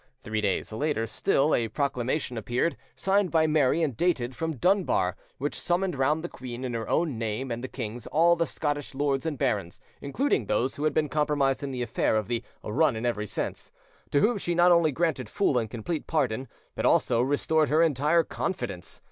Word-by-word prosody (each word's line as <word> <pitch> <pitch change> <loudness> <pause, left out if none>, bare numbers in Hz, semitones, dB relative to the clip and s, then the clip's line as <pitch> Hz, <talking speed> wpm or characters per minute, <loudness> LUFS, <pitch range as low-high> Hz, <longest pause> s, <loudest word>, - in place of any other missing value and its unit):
Three 110 0 -2
days 100 +1 -1
later 130 -1 0
still, 135 +6 +1
a 115 - +2
proclamation 130 +1 -1
appeared, 120 +8 0 0.2
signed 195 0 +2
by 160 -1 +3
Mary 155 +1 +3
and 140 -6 -1
dated 130 -6 0
from 160 -1 -2
Dunbar, 175 - +2 0.2
which 145 +2 -2
summoned 180 0 -1
round 145 +4 +1
the - - -2
queen, 125 -5 -8
in 125 - -3
her 115 -1 -4
own 155 -9 0
name 115 +3 -3
and 115 +1 -4
the - - -3
king's, 120 -2 -6
all 170 +2 +4
the 165 -1 0
Scottish 145 -3 -3
lords 140 +1 0
and 150 -3 -2
barons, 105 -9 -1 0.2
including 140 - 0
those 125 +5 0
who 145 - -3
had 155 - +2
been 155 -1 +2
compromised 145 -1 +1
in 140 - -3
the 125 -2 -3
affair 115 -1 0
of 110 -2 0
the 120 0 -2 0.2
"run 130 +5 +2
in 110 +2 -3
every 105 -3 -1
sense," - - -4 0.4
to 140 - +2
whom 220 -1 +2
she 175 -2 -1
not 175 +1 +5
only 170 -3 +4
granted 140 -6 -1
full 135 - +2
and 110 -2 -3
complete 125 +8 -4
pardon, 135 -5 0 0.3
but - - -4
also 120 -2 +3
restored 145 +3 +1
her 155 +2 +4
entire 155 +2 +3
confidence. 95 - -4
140 Hz, 200 wpm, -27 LUFS, 120-160 Hz, 0.4 s, not